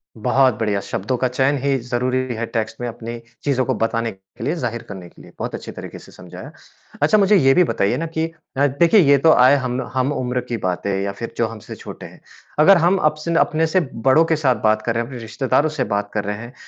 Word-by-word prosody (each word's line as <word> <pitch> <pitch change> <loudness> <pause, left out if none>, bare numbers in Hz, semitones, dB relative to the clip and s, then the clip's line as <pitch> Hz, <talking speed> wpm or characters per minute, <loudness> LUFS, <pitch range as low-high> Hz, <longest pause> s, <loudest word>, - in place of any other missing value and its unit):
बहुत 130 +3 +2
बढ़िया, 105 -3 0
शब्दों 115 +4 -3
का 130 - +1
चयन 130 +3 +1
ही 140 -1 +2
ज़रूरी 125 +1 -1 0.2
है 115 +1 -3
टेक्स्ट 110 -1 -4
में 120 - -2
अपनी 115 0 -7 0.2
चीज़ों 130 -3 +1
को - - 0
बताने 115 0 -1
के 95 -1 -14
लिए, 150 - -1
ज़ाहिर 120 -7 -4
करने 95 -3 -8
के - - -18
लिए, - - -15
बहुत - - -4
अच्छी - - -8
तरीके - - -9
से - - -16
समझाया। - - -11 0.5
अच्छा, 155 +9 +4
मुझे 205 0 +4
ये 135 -8 +5
भी 180 - +5
बताइए 100 - 0
ना 165 - -2
कि 160 - +1 0.3
अ, 140 +1 +4
देखिए 165 +9 +4
ये 140 -5 +5
तो 160 +4 +4
आये 130 0 +6
हम 130 -1 -2
हम-उम्र 130 -1 -1
की 120 - -2
बातें 90 0 -2
हैं 95 - -1
या 100 0 -2
फिर 115 +4 -7
जो 115 - +1
हमसे 110 -1 -9
छोटे - - -10
हैं। - - -13 0.4
अगर 190 +5 +7
हम 175 +3 +3
अब 155 -4 +2
से 170 - -2
ना 165 - +3
अपने 160 +1 +2
से 175 +4 +2 0.3
बड़ों 150 +5 +6
के 160 - +1
साथ 140 -5 +2
बात 110 0 +3
कर 115 +1 -1
रहे 115 - +1
हैं, - - -9
अपने 130 -1 -8
रिश्तेदारों 130 +6 0
से 150 -4 -2
बात 100 -2 -2
कर 105 - -1
रहे 105 0 -3
हैं, 120 +3 -10
125 Hz, 250 wpm, -20 LUFS, 115-145 Hz, 0.5 s, अगर